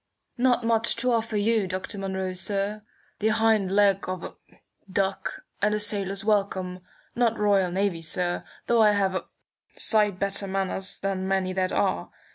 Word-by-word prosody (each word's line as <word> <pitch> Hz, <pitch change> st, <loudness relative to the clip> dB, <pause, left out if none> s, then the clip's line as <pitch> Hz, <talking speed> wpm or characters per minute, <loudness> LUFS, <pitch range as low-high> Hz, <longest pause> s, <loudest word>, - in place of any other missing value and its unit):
"Not 245 Hz, -1 st, +3 dB
much 230 Hz, 0 st, +2 dB
to 250 Hz, +2 st, 0 dB
offer 225 Hz, -2 st, 0 dB
you, 215 Hz, -1 st, +2 dB
Dr. 185 Hz, +2 st, -4 dB
Munro, 190 Hz, -1 st, -2 dB
sir. 200 Hz, +3 st, -2 dB, 0.4 s
The 215 Hz, -, +1 dB
hind 220 Hz, -3 st, +3 dB
leg 195 Hz, -1 st, +3 dB
of 185 Hz, -2 st, -4 dB
a -, -, -6 dB, 0.6 s
duck, 195 Hz, 0 st, -1 dB, 0.2 s
and 210 Hz, 0 st, +2 dB
a -, -, -1 dB
sailor's 200 Hz, -2 st, -1 dB
welcome. 190 Hz, -3 st, 0 dB, 0.4 s
Not 235 Hz, -2 st, +2 dB
Royal 200 Hz, -3 st, +3 dB
Navy, 185 Hz, -2 st, 0 dB
sir, 175 Hz, +2 st, -1 dB, 0.2 s
though 235 Hz, -1 st, +3 dB
I 210 Hz, -1 st, +6 dB
have 195 Hz, -2 st, +1 dB
a 185 Hz, -, -3 dB, 0.5 s
sight 210 Hz, -4 st, +2 dB
better 200 Hz, +1 st, 0 dB
manners 190 Hz, 0 st, -2 dB
than 190 Hz, -1 st, -1 dB
many 190 Hz, -1 st, 0 dB
that 185 Hz, 0 st, 0 dB
are. -, -, 0 dB
195 Hz, 160 wpm, -26 LUFS, 190-215 Hz, 0.6 s, I